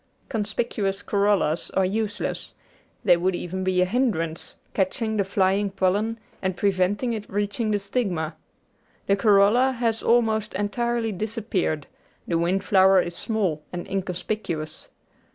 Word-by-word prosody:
Conspieuous 205 -2 -2
corollas 200 -6 +1
are 190 - +3
use 210 +1 -1
less; - - -4 0.5
they 180 -3 +7
would 180 +1 0
even 185 +2 -4
be 185 -1 +2
a - - +4
hindrance, 185 -7 -1 0.2
catching 220 +3 0
the 205 - +2
flying 195 +1 +1
pollen 200 +4 0 0.2
and 190 -2 -1
preventing 200 +5 +1
it 210 -2 -5
reaching 205 +2 -1
the 210 - +2
stigma. 195 -6 -2 0.7
The 200 - +3
corolla 210 +5 +4
has 230 -2 0
almost 220 -3 +2
entirely 230 +3 -1
disappeared, 200 -7 -2 0.4
the 165 -1 +1
wind 180 +3 +1
flower 190 -1 +5
is 175 -1 -2
small 190 -9 -1
and 175 -1 -5
inconspicuous. 180 -3 -4
200 Hz, 135 wpm, -25 LUFS, 185-220 Hz, 0.7 s, they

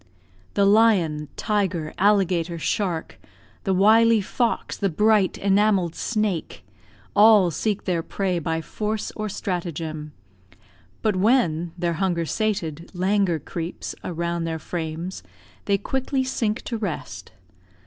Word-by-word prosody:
The 200 - +4
lion, 195 -8 +3
tiger, 190 -7 -1
alligator, 185 -4 +2
shark 170 0 -2 0.5
The 195 - +2
wily 225 +3 +5
fox, 230 +4 -1
the 200 - 0
bright 210 +2 +3
enamelled 195 -3 +2
snake 210 -6 -2 0.5
All 210 -4 +6
seek 205 +6 -1
their 175 -3 0
prey 185 +1 -2
by 160 0 -2
force 215 +5 -3
or 215 -1 -3
stratagem; 165 -6 -4 0.9
But 210 -4 +1
when 180 -7 +2
their 170 -1 0
hunger 175 -3 +1
sated 170 -6 -2
languor 190 -1 +2
creeps 165 +3 -6
Around 170 0 -2
their 165 -1 -2
frames, 165 +2 -5 0.4
they 200 -1 +2
quickly 265 +5 -1
sink 235 -3 -1
to 230 -3 -4
rest. 150 - -5
190 Hz, 120 wpm, -24 LUFS, 165-210 Hz, 0.9 s, All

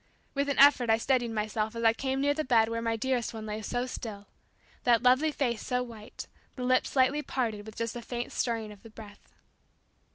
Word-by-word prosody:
With 280 0 -1
an 280 - -1
effort 270 -4 +6
I 225 - +5
steadied 245 0 +1
myself 215 0 -2
as 230 - -4
I 225 0 +5
came 265 +2 -2
near 285 +1 +3
the 310 +1 -2
bed 230 -4 +3
where 230 0 -2
my 230 0 0
dearest 240 0 -1
one 220 -1 -6
lay 215 0 -4
so 245 +3 -2
still 215 -5 -7 0.6
that 235 -1 +3
lovely 260 +5 +4
face 245 -6 -1
so 250 0 -1
white, 225 -2 -9 0.3
the 255 - -5
lips 255 +1 +2
slightly 275 +2 +2
parted 220 -7 -3
with 220 - -10
just 230 0 -3
a 240 - -5
faint 240 +1 -5
stirring 225 -3 -2
of 205 -2 -14
the 225 - -13
breath. 215 -2 -14
235 Hz, 215 wpm, -29 LUFS, 220-260 Hz, 0.6 s, effort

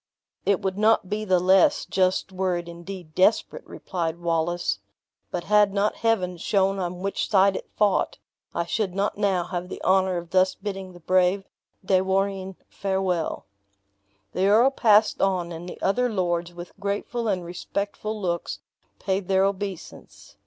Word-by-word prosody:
"It 200 0 +3
would 190 +1 -2
not 215 -3 +3
be 215 +1 -1
the 185 -3 +3
less 185 +1 +4
just 185 0 +1
were 185 -1 0
it 175 0 -6
indeed 170 -1 -9
desparate," 215 - +2
replied 170 -3 -4
Wallace; 170 - -1 0.5
"but 175 - -3
had 210 0 +3
not 200 +1 +1
Heaven 190 -6 0
shown 195 +2 +1
on 180 0 -4
which 195 - -2
side 195 -1 +4
it - - -6
fought, 205 -3 +1 0.4
I 170 - 0
should 190 0 -2
not 200 +1 -1
now 195 -4 +2
have 180 0 -5
the - - -6
honor 190 -1 +3
of 170 -1 -7
thus 185 0 +3
bidding 195 -2 -6
the 175 - -13
brave 185 +3 +2 0.4
De 185 -1 +3
Warenne 190 0 -1
farewell." 190 -4 -2 0.9
The 190 +2 +1
earl 230 +6 +5
passed 215 -4 +4
on, 180 -3 +1
and 170 +2 -7
the - - -9
other 245 +6 +2
lords, 175 -4 -1
with 175 0 -9
grateful 205 +4 -2
and 185 -4 -1
respectful 200 +4 -4
looks, 175 -3 -2 0.4
paid 190 -1 -2
their 190 0 +3
obeisance. 195 -2 -6
190 Hz, 160 wpm, -25 LUFS, 180-200 Hz, 0.9 s, earl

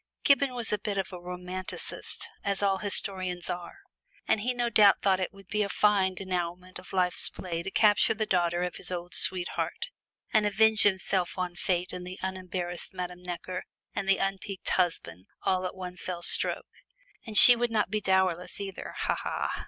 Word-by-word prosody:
Gibbon 280 -2 +3
was 235 -3 -2
a 210 - 0
bit 205 -1 -3
of 190 -1 -2
a 180 - -6
romanticist, 180 +1 -6 0.2
as 200 0 -1
all 195 -1 +2
historians 185 -3 0
are, 180 - -7 0.5
and 215 - +2
he 245 +4 0
no 245 -1 -1
doubt 210 -2 +6
thought 190 -2 +3
it 185 - -2
would 195 -1 -16
be 210 +2 -1
a 200 - 0
fine 200 -3 +2
denouement 180 -1 -4
to 180 +1 -10
life's 180 -1 +2
play 170 -2 -5
to 195 - -5
capture 210 +1 +4
the 215 0 -1
daughter 175 -2 +1
of 180 - -3
his - - -2
old 175 -1 -5
sweetheart, 185 - -1 0.4
and 215 -1 +4
avenge 220 +1 +4
himself 190 -2 +2
on 180 -1 -2
Fate 180 -1 -1
and 180 0 -6
the 185 +1 -7
unembarrassed 185 -1 -4
Madame 180 0 -5
Necker 180 +1 -5 0.3
and 195 - -3
the 195 - +5
unpiqued 195 0 -3
husband, 100 - -1 0.2
all 185 -1 +1
at - - -8
one 180 -1 -7
fell 175 -2 -5
stroke - - +1 0.6
and 215 -2 0
she 245 - +11
would 240 0 0
not 215 -3 0
be 215 0 0
dowerless 190 -2 +1
either. 195 -2 -6
Ha, - - +1
ha! - - -3
185 Hz, 185 wpm, -28 LUFS, 180-205 Hz, 0.6 s, she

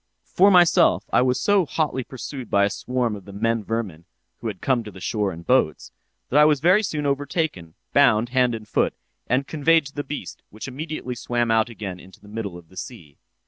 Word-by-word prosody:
"'For 195 +3 +4
myself, 180 -2 +4
I - - +5
was 125 0 +1
so 205 -2 +3
hotly 150 -4 -1
pursued 130 0 -8
by 100 0 +3
a 100 - -1
swarm 125 -1 -2
of 100 - -11
the 100 - -10
men 115 +2 -1
vermin 100 -7 -4 0.3
(who 115 - -5
had 100 -4 -5
come 125 +1 +1
to 110 - -8
the 95 -2 -12
shore 105 +1 -1
in 85 -1 -9
boats) 85 - +1 0.4
that 145 - +5
I 150 - +7
was 150 -2 +3
very 180 +8 +4
soon 155 -8 -3
overtaken, 140 - -2 0.2
bound 120 -5 +4
hand 125 -2 +2
and 110 -1 -9
foot, - - 0 0.3
and 130 +3 +1
conveyed 160 +1 +2
to 140 - -10
the 145 - -4
beast, 95 -12 -7
which 110 +5 -8
immediately 140 -1 -5
swam 120 -1 -1
out 110 +1 +2
again 100 -5 -7
into 95 0 -16
the 105 - -18
middle 105 -4 -5
of 85 -2 -15
the 95 - -17
sea. 85 - -9
120 Hz, 215 wpm, -23 LUFS, 105-145 Hz, 0.4 s, I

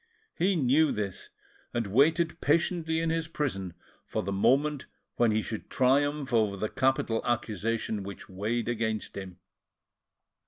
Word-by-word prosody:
He 190 +3 +1
knew 145 +1 +3
this, 100 -3 -4 0.5
and 120 -1 0
waited 160 - +2
patiently 160 +1 +1
in 165 -1 0
his 165 -1 -1
prison 95 - -3 0.3
for - - -3
the 100 - -3
moment 140 +8 +2 0.3
when 120 -1 +4
he 110 0 +1
should 110 - -6
triumph 140 +1 +2
over 105 -4 +2
the 110 +2 -2
capital 130 -4 +1
accusation 115 -2 -1
which 100 0 -8
weighed 105 +5 -2
against 110 -2 -2
him. 95 -2 -7
120 Hz, 135 wpm, -29 LUFS, 105-150 Hz, 0.5 s, when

